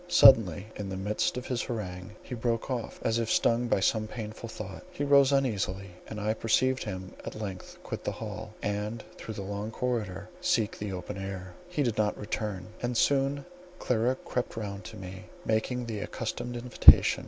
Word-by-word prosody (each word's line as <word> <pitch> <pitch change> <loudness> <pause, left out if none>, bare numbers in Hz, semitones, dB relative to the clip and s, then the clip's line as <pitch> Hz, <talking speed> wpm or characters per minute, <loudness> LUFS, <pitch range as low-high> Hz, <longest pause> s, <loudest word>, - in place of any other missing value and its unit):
Suddenly 105 - +7
in 100 -2 -4
the 95 - -4
midst 105 +5 0
of 125 - -4
his 125 -2 -1
harangue 95 -3 -5
he - - -7
broke 115 +1 -1
off, 120 -3 -3
as 115 +1 +2
if 115 -1 -1
stung 120 +1 +3
by 100 - +2
some 110 +3 +2
painful 110 0 -6
thought; 100 -4 -7
he 180 -5 -4
rose 140 -1 +6
uneasily, 100 -8 0 0.2
and 110 - -6
I 105 +1 +1
perceived 130 +4 +2
him 95 -3 -5
at - - -6
length 95 -4 -6
quit - - -5
the - - -1
hall, 110 0 -7
and 105 +2 -2
through 110 - -7
the 100 - -4
long 100 +2 -4
corridor 110 -5 -2
seek 120 -12 +1
the 105 -1 -3
open 90 +1 -5
air. 95 -1 -6
He 180 -5 0
did 120 -5 0
not 105 -1 +2
return; 105 -3 -3 0.2
and 120 -1 -1
soon 140 +1 +2 0.3
Clara 125 -2 +1
crept 125 -2 -3
round 100 -1 -5
to 110 -1 -8
me, 95 -1 -8 0.2
making 120 +3 0
the 110 -3 -4
accustomed 120 +4 -4
invitation. 120 +1 +7
110 Hz, 185 wpm, -29 LUFS, 100-120 Hz, 0.3 s, Suddenly